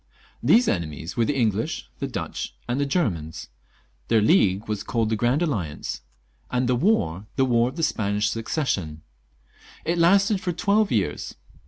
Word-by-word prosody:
These 235 Hz, +1 st, +5 dB
enemies 80 Hz, 0 st, -2 dB
were 115 Hz, -, +2 dB
the 145 Hz, -, 0 dB
English, 110 Hz, -3 st, 0 dB
the -, -, -2 dB
Dutch, -, -, -5 dB
and 120 Hz, +3 st, -1 dB
the -, -, +2 dB
Em -, -, -6 dB, 0.2 s
peror. 80 Hz, -1 st, -8 dB, 0.6 s
Their 115 Hz, -, +4 dB
league 105 Hz, -, +3 dB
was 105 Hz, -2 st, -2 dB
called 110 Hz, 0 st, -1 dB
the -, -, +2 dB
Grand 120 Hz, +9 st, +1 dB
Alliance, 85 Hz, -, -3 dB, 0.5 s
and 125 Hz, 0 st, 0 dB
the 125 Hz, -, +2 dB
war, 110 Hz, -, +1 dB
the 135 Hz, -, +3 dB
War 120 Hz, -1 st, +3 dB
of 130 Hz, -, -11 dB
the 165 Hz, -, -3 dB
Spanish 105 Hz, -6 st, 0 dB
Succession; 105 Hz, -, -2 dB, 0.8 s
it 170 Hz, +2 st, 0 dB
lasted 195 Hz, +3 st, +4 dB
for 175 Hz, -, -2 dB
twelve 205 Hz, +4 st, +2 dB
.years. 105 Hz, -5 st, -1 dB
115 Hz, 165 wpm, -24 LUFS, 100-155 Hz, 0.8 s, These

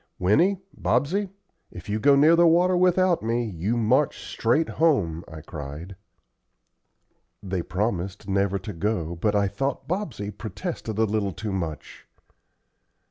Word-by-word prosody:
"Winnie, 160 Hz, -, +3 dB, 0.2 s
Bobsey, 195 Hz, +7 st, 0 dB, 0.4 s
if 90 Hz, +1 st, -11 dB
you 105 Hz, +1 st, -1 dB
go 140 Hz, +6 st, +5 dB
near 155 Hz, +4 st, +6 dB
the 170 Hz, 0 st, +5 dB
water 175 Hz, +3 st, +4 dB
without 180 Hz, 0 st, +3 dB
me 115 Hz, +2 st, 0 dB
you 105 Hz, +3 st, -2 dB
march 125 Hz, +6 st, +2 dB
straight 135 Hz, +8 st, +1 dB
home," 95 Hz, -, +1 dB
I 80 Hz, -1 st, -9 dB
cried. 80 Hz, +3 st, -8 dB, 1.5 s
They 95 Hz, -2 st, -2 dB
promised 95 Hz, +1 st, -3 dB
never 100 Hz, 0 st, +1 dB
to 100 Hz, +2 st, -7 dB
go, 85 Hz, -2 st, -2 dB
but 105 Hz, +5 st, 0 dB
I 100 Hz, -1 st, +3 dB
thought 135 Hz, +5 st, -3 dB
Bobsey 150 Hz, -, -3 dB
protested 105 Hz, +2 st, -6 dB
a 110 Hz, -, +3 dB
little 105 Hz, -3 st, 0 dB
too 105 Hz, +4 st, -5 dB
much. 85 Hz, -5 st, -5 dB
105 Hz, 135 wpm, -25 LUFS, 95-145 Hz, 1.5 s, near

